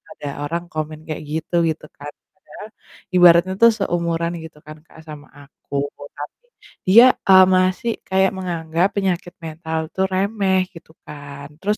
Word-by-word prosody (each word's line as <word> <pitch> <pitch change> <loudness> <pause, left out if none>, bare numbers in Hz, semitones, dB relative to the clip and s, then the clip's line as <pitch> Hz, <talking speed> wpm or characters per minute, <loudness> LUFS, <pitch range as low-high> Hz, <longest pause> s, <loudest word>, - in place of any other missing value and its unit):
ada 145 - -6 0.2
orang 170 +3 -3
komen 155 0 -5
kayak 155 0 -5
gitu, 160 +2 -3
gitu 160 - -4
kan, 145 +1 -8 0.2
padahal 200 +2 -13 0.5
ibaratnya 175 +1 +6
tuh 230 0 +8
seumuran 170 -3 -1
gitu 160 -2 -12
kan, 155 +1 -11
Kak, 160 - -18
sama 150 -1 -10
aku 140 0 -5 0.3
tapi 150 - -10 0.4
dia, 230 +7 +8 0.2
eee, 190 -1 +9
masih 185 +5 +1 0.2
kayak 190 0 +2
menganggap 170 0 -1
penyakit 185 -3 -2
mental 160 0 -4 0.2
tuh 190 0 +1
remeh 195 0 +1
gitu 165 -2 -15
kan 145 -1 -10
terus 210 +2 0
170 Hz, 150 wpm, -20 LUFS, 155-190 Hz, 0.5 s, eee